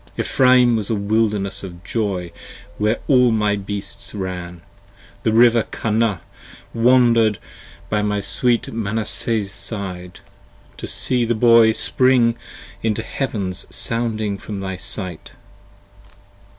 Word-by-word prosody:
Ephraim 125 -2 +4
was 105 -3 -3
a 115 - +1
wilderness 105 -1 -1
of 90 -2 -9
joy 95 -4 -2 0.5
where 105 +2 +1
all 125 -3 +5
my 110 -2 +1
wild 100 -1 -3
beasts 105 +3 -7
ran, 90 -3 -6 0.6
The 110 - +1
River 115 +1 +5
Kanah 110 -5 0 0.5
wander'd 115 -3 +4 0.5
by 105 +2 0
my 105 0 0
sweet 115 +5 0
Manasseh's 110 -1 -2
side, 95 -4 -7 0.6
To - - -6
see 125 -2 0
the 120 0 0
boy 115 0 +6
spring 125 -1 +3 0.5
into 110 -2 -1
heavens 100 -9 -3
sounding 110 -3 -1
from 105 -2 -6
my 95 -1 -4
sight! 90 -2 -6
110 Hz, 115 wpm, -20 LUFS, 100-115 Hz, 0.6 s, boy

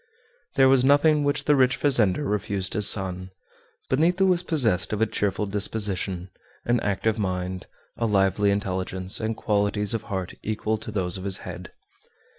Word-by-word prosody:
There 135 -1 +5
was 130 -1 +4
nothing 145 +2 +4
which 145 0 0
the 145 +1 +3
rich 130 -2 +2
fazender 135 -1 +2
refused 100 -2 -2
his 105 -1 +5
son. 95 -2 +1 0.6
Benito 175 +8 +2
was 180 -2 +2
possessed 115 - +1
of 105 - -2
a 110 - +3
cheerful 105 -1 -2
disposition, 100 -3 -2 0.3
an 120 0 +2
active 110 +2 -1
mind, 90 -1 -3 0.3
a 115 - 0
lively 100 0 +2
intelligence, 95 -1 -2
and 110 0 -3
qualities 105 0 0
of 115 - -2
heart 95 -2 -4
equal 110 0 -2
to 110 - -7
those 95 -3 -2
of - - -9
his 95 -1 -1
head. - - -8
105 Hz, 160 wpm, -24 LUFS, 95-125 Hz, 0.6 s, There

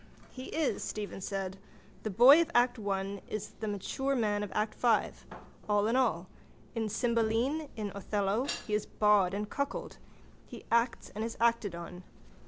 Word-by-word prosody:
—He 255 0 -8
is, 315 0 -1
Stephen 205 -2 -5
said. 195 -1 -4 0.4
The 215 - -3
boy 255 - +8
of 335 - -1
act 245 0 +3
one 195 -1 -2
is 215 -1 -4
the 220 - -3
mature 265 +7 -2
man 210 -4 +1
of 205 - -4
act 215 0 0
five. 235 -3 +1 0.4
All 205 0 +3
in 230 +3 +1
all. 215 -9 +1 0.5
In 225 -2 -2
Cymbeline, 235 +7 0
in 210 -3 -4
Othello 200 +3 -1 0.2
he 215 - -4
is 210 0 0
bawd 205 -3 +3
and 210 +1 -3
cuckold. 280 +5 -4 0.5
He - - -10
acts 235 +1 +1
and 215 - -3
is 230 0 -4
acted 230 -5 +2
on. 170 +1 -8
215 Hz, 165 wpm, -31 LUFS, 200-240 Hz, 0.5 s, boy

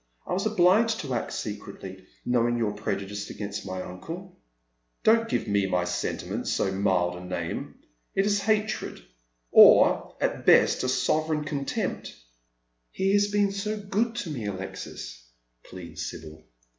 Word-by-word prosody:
I - - -3
was 195 +4 0
obliged 215 +3 +3
to 135 -4 -4
act 120 - -2
secretly, 100 -3 -7 0.2
knowing 120 -1 +2
your 115 -3 0
prejudice 105 -1 -4
against 100 -1 -6
my 95 0 -4
uncle." 170 - -8 0.4
" - - -48
Don't 225 +1 +4
give - - -1
my 95 -3 +1
sentiment 90 0 -3
so 95 - 0
mild 95 -3 +1
a 90 - -9
name. 85 -2 -4 0.4
It 195 - +3
is 205 -1 +2
hatred— 215 - -1 0.5
or - - +7
at - - -1
best - - +5
a 130 - 0
sovereign 150 +4 +1
contempt." 145 -2 -3 0.4
" - - -48 0.3
He 195 +1 0
has 205 0 +4
been 205 -1 +2
so 210 +2 -3
go~i 205 +3 0
to 165 - -6
me, 120 -8 -4
Alexis," 95 -10 -7 0.4
pleads 90 -2 -7
Sibyl. - - -8
Between 80 -1 -10
Love - - -13
and - - -25
Gold. - - -37
120 Hz, 160 wpm, -27 LUFS, -, 0.5 s, or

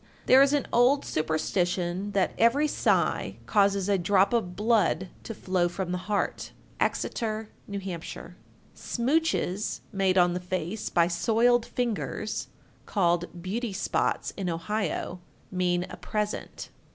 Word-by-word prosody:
There 260 +1 +7
is 275 0 +5
an 290 -3 +1
old 250 +4 +4
superstition 175 +4 -1
that 195 -1 +1
every 255 +7 +4
sigh - - +1
causes 200 -2 +2
a 200 -2 +2
drop 195 +4 +3
of 180 -7 0
blood 205 -5 +2
to 225 - -7
flaw 185 -3 0
from 180 +1 -4
the 180 - -1
heart. 205 - -1 0.3
Exeter, 220 -1 -1 0.2
N.H. 200 -1 -5
1374. 170 -4 -7 0.4
"Smooches" 245 - 0
made 195 -1 +2
on 175 -1 +5
the 180 - -2
face 180 +2 -3
by 170 -1 +3
soiled 230 +7 +2
fingers 225 -3 -2 0.4
(called 175 -2 0
beauty 215 +3 -3
spots 190 - -1
in 190 -3 -3
Ohio) 180 +1 -2 0.3
mean 180 -1 +1
a - - -9
present. 210 -1 -4
195 Hz, 130 wpm, -27 LUFS, 180-225 Hz, 0.4 s, There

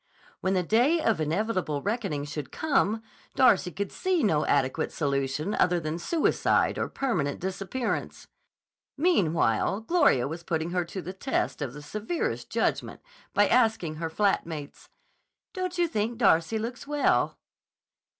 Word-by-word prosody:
When 190 +1 0
the 180 - +2
day 245 - +3
of 225 - +1
inevitable 165 -2 -1
reckoning 195 -9 -2
should 145 -1 -6
come, 225 -8 +1 0.3
Darcy 205 -8 +4
could 200 +2 -4
see 370 -5 0
no 155 -7 +2
adequate 135 -2 +1
solution 140 +4 -1
other 180 -1 +2
than 155 +1 -4
suicide 320 - +1
or - - -1
permanent 175 - -1
disappearance. 195 +6 -3 0.7
Meanwhile 190 - +2
Gloria 280 - +3
was 165 +4 -6
putting 165 0 -2
her 180 -1 0
to 180 +2 -6
the 185 - -6
test 225 - -2
of 135 -4 -3
the 150 0 -9
severest 215 - -3
judgment - - -1 0.3
by 205 0 +5
asking 220 -10 +2
her 165 0 -3
flat 200 +4 +1
mates: 150 -3 -8 0.6
"Don't 365 -1 -3
you 350 -1 +3
think 225 -4 -2
Darcy 195 -2 +3
looks 235 +5 -5
well?" 295 0 +1
190 Hz, 140 wpm, -27 LUFS, 155-235 Hz, 0.7 s, by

